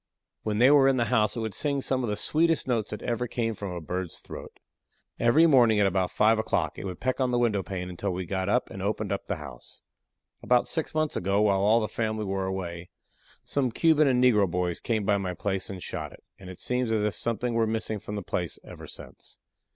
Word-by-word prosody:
When 105 Hz, -1 st, -2 dB
they 125 Hz, +5 st, +6 dB
were 140 Hz, -2 st, +6 dB
in 135 Hz, -1 st, +3 dB
the 120 Hz, -, +2 dB
house 105 Hz, -2 st, +2 dB
it -, -, -2 dB
would 110 Hz, -2 st, -3 dB
sing 140 Hz, -2 st, 0 dB
some 130 Hz, -1 st, 0 dB
of 120 Hz, -, -2 dB
the 105 Hz, -, 0 dB
sweetest 165 Hz, +5 st, +1 dB
notes 115 Hz, -4 st, 0 dB
that 105 Hz, -, -6 dB
ever 120 Hz, +1 st, -1 dB
came 115 Hz, -1 st, -1 dB
from 100 Hz, -2 st, -6 dB
a 90 Hz, -, -4 dB
bird's 90 Hz, +1 st, -4 dB
throat. -, -, -10 dB, 0.6 s
Every 130 Hz, +8 st, +5 dB
morning 120 Hz, -8 st, +5 dB
at 100 Hz, -, +4 dB
about 95 Hz, -1 st, +1 dB
5 110 Hz, +1 st, +3 dB
o'clock 110 Hz, -, -1 dB
it -, -, -6 dB
would 90 Hz, -2 st, -6 dB
peck 130 Hz, +1 st, -1 dB
on 130 Hz, -1 st, +2 dB
the 120 Hz, -, +1 dB
window 115 Hz, -5 st, +2 dB
pane 90 Hz, 0 st, -5 dB
until 90 Hz, +3 st, -4 dB
we 90 Hz, 0 st, -3 dB
got 95 Hz, +2 st, -2 dB
up 125 Hz, +4 st, +1 dB
and 95 Hz, -, -7 dB
opened 100 Hz, 0 st, -2 dB
up 100 Hz, -, -3 dB
the -, -, -1 dB
house. -, -, -11 dB, 0.6 s
About 125 Hz, -1 st, +2 dB
six 160 Hz, -1 st, -3 dB
months 155 Hz, -1 st, 0 dB
ago 100 Hz, +2 st, +1 dB
while 100 Hz, -2 st, +3 dB
all 110 Hz, +3 st, +4 dB
the 110 Hz, -, -1 dB
family 110 Hz, -1 st, -2 dB
were 95 Hz, -1 st, -2 dB
away 90 Hz, -2 st, -5 dB, 0.6 s
some 135 Hz, -3 st, 0 dB
Cuban 155 Hz, +3 st, +4 dB
and 125 Hz, -1 st, +3 dB
negro 105 Hz, -7 st, +4 dB
boys 90 Hz, 0 st, -1 dB
came 110 Hz, -3 st, -1 dB
by 100 Hz, -1 st, +2 dB
my 90 Hz, -2 st, -3 dB
place 95 Hz, +1 st, -2 dB
and 95 Hz, -2 st, -7 dB
shot -, -, -5 dB
it, -, -, -16 dB, 0.2 s
and 95 Hz, -, -10 dB
it 90 Hz, -, -10 dB
seems 125 Hz, -2 st, -1 dB
as 110 Hz, -2 st, +1 dB
if 105 Hz, -, 0 dB
something 120 Hz, +1 st, -2 dB
were 115 Hz, -1 st, +2 dB
missing 110 Hz, -1 st, -2 dB
from 105 Hz, +1 st, -7 dB
the 100 Hz, -, -4 dB
place 85 Hz, -3 st, -3 dB
ever -, -, -11 dB
since. -, -, -12 dB
110 Hz, 235 wpm, -27 LUFS, 95-125 Hz, 0.6 s, they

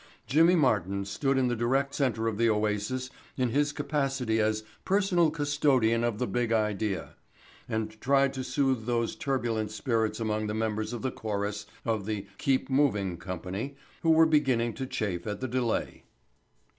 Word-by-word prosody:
Jimmy 165 Hz, +6 st, +5 dB
Martin 100 Hz, -, +1 dB
stood 135 Hz, +7 st, 0 dB
in 130 Hz, -1 st, +3 dB
the 120 Hz, -, 0 dB
direct 135 Hz, +4 st, +1 dB
center 115 Hz, -5 st, 0 dB
of 110 Hz, -1 st, -2 dB
the 115 Hz, 0 st, +4 dB
oasis 110 Hz, +5 st, -1 dB, 0.3 s
in 125 Hz, -2 st, +1 dB
his 145 Hz, +4 st, +1 dB
capacity 135 Hz, -6 st, -1 dB
as 110 Hz, 0 st, +1 dB, 0.2 s
Personal 190 Hz, -4 st, +3 dB
Custodian 145 Hz, -6 st, +2 dB
of 120 Hz, -3 st, 0 dB
the 125 Hz, -, 0 dB
Big 120 Hz, -2 st, -1 dB
Idea 105 Hz, -2 st, 0 dB, 0.6 s
and 110 Hz, 0 st, -3 dB
tried 140 Hz, 0 st, +3 dB
to 130 Hz, -1 st, -4 dB
soothe 130 Hz, -4 st, 0 dB
those 120 Hz, -1 st, 0 dB
turbulent 120 Hz, -6 st, -1 dB
spirits 110 Hz, 0 st, -1 dB
among 110 Hz, -1 st, -1 dB
the 105 Hz, -, -2 dB
members 110 Hz, 0 st, -1 dB
of 120 Hz, 0 st, -5 dB
the 130 Hz, -, 0 dB
chorus 105 Hz, -1 st, -3 dB, 0.2 s
of 110 Hz, -3 st, -1 dB
the 105 Hz, -2 st, -3 dB
"Keep 135 Hz, -1 st, +1 dB
Moving" 120 Hz, -10 st, +1 dB
company 95 Hz, +9 st, -5 dB, 0.3 s
who 165 Hz, -, +1 dB
were 160 Hz, 0 st, +7 dB
beginning 130 Hz, -7 st, +2 dB
to 130 Hz, -, -5 dB
chafe 100 Hz, -6 st, -3 dB
at 105 Hz, -1 st, -3 dB
the 130 Hz, -, -2 dB
delay. 120 Hz, -2 st, -1 dB
115 Hz, 165 wpm, -29 LUFS, 110-135 Hz, 0.6 s, were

